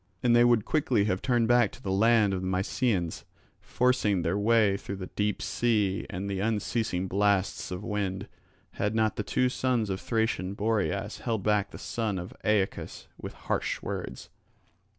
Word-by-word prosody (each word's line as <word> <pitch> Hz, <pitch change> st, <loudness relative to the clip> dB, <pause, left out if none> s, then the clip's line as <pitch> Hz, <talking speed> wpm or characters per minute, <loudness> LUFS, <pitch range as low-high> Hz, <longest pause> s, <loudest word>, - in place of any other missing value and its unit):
And 120 Hz, -1 st, +4 dB
they 120 Hz, -, +6 dB
would 120 Hz, -3 st, +3 dB
quickly 130 Hz, -9 st, +1 dB
have 95 Hz, -2 st, -1 dB
turned 120 Hz, -3 st, +2 dB
back 120 Hz, -3 st, +4 dB
to -, -, -12 dB
the 95 Hz, -, -2 dB
land 110 Hz, 0 st, +4 dB
of 95 Hz, -, -2 dB
the 95 Hz, -, -3 dB
Mysians, 95 Hz, -1 st, -1 dB, 0.4 s
forcing 120 Hz, -7 st, +1 dB
their 85 Hz, +3 st, 0 dB
way 105 Hz, -1 st, +3 dB
through 100 Hz, 0 st, -6 dB
the 95 Hz, -2 st, -8 dB
deep 105 Hz, 0 st, -1 dB
sea 105 Hz, -4 st, 0 dB
and 95 Hz, +2 st, -4 dB
the 100 Hz, -1 st, -2 dB
unceasing 105 Hz, -2 st, -1 dB
blasts 100 Hz, 0 st, +1 dB
of 90 Hz, 0 st, -5 dB
the -, -, -7 dB
wind, 100 Hz, -3 st, -2 dB, 0.4 s
had 105 Hz, +2 st, -2 dB
not 110 Hz, -1 st, +2 dB
the -, -, -2 dB
two 125 Hz, +4 st, +1 dB
sons 125 Hz, -5 st, 0 dB
of 95 Hz, -, -3 dB
Thracian 110 Hz, -4 st, -1 dB
Boreas 105 Hz, 0 st, -1 dB
held 110 Hz, -4 st, -2 dB
back 105 Hz, -1 st, +1 dB
the -, -, -10 dB
son 110 Hz, -4 st, -2 dB
of 90 Hz, 0 st, -6 dB
Aeacus 105 Hz, -2 st, -1 dB
with -, -, -7 dB
harsh -, -, -1 dB
words. -, -, -5 dB
105 Hz, 175 wpm, -28 LUFS, 95-115 Hz, 0.4 s, they